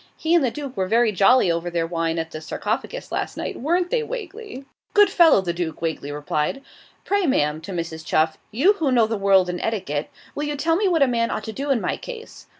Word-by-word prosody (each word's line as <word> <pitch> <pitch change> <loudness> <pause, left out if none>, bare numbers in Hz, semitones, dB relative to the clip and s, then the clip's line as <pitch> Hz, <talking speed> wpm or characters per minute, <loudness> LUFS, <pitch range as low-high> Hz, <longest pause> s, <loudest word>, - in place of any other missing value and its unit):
He 325 +1 0
and 340 -4 +5
the 255 - +2
Duke 280 0 -7
were 190 -2 -1
very 230 +2 +3
jolly 200 0 +4
over 170 +1 -2
their 170 -1 -1
wine 165 0 -2
at 165 0 -3
the 155 - -7
"Sarcophagus" 225 - -4
last - - -3
night; - - -4
weren't 350 +5 0
they, - - +2
Wagley?' 425 - -7 0.3
'Good 410 -2 +6
fellow, 330 - +6
the 175 -2 -2
Duke,' 170 -2 -4
Wagley 160 -3 -3
replied. 150 - -2 0.4
'Pray, 405 -3 +1
ma'am' 150 - +1
(to 170 - -8
Mrs. 165 -2 -4
Chuff), 155 0 +1
'you 280 - +3
who 320 -9 -1
know 235 -3 +4
the 225 +1 -2
world 195 -2 +4
and 180 0 -4
etiquette, 185 -10 -2 0.2
will 295 - -3
you 295 0 -2
tell 325 +3 +1
me 400 +3 +1
what 330 -5 +3
a - - +3
man 230 -1 0
ought 215 - -3
to 220 - -6
do 280 +5 -4
in 270 -4 +3
my - - -2
case? 470 -2 -10
225 Hz, 235 wpm, -23 LUFS, -, 0.4 s, Good